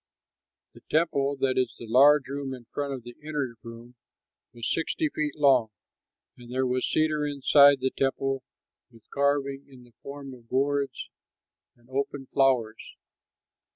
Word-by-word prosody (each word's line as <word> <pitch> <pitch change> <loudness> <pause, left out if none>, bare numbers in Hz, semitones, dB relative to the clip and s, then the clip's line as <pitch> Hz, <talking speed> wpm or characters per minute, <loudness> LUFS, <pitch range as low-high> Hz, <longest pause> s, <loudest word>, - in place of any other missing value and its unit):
The - - -16
temple, 145 -3 +1
that 130 -1 +2
is 125 -3 -1
the 120 - -9
large 135 +5 +5
room 140 -1 -4
in 120 -2 -14
front 145 -1 -3
of 130 -3 -6
the 120 0 -11
inner 145 -5 -3
room, 115 +1 -11 0.6
was 120 -1 -5
sixty 295 - -1
feet 150 - -3
long. 135 -6 +4 0.7
And 120 0 -13
there 130 +1 0
was 125 0 -1
cedar 155 -1 +1
inside 140 -1 +5
the 130 0 0
temple 135 0 -1 0.5
with 115 -2 -21
carving 140 -1 0
in 130 -2 -15
the 120 -1 -21
form 140 -1 -8
of 120 -2 -16
gourds 140 +1 -1 0.6
and 120 0 -27
open 135 +1 -3
flowers. 125 -5 +1
135 Hz, 150 wpm, -27 LUFS, 125-140 Hz, 0.7 s, large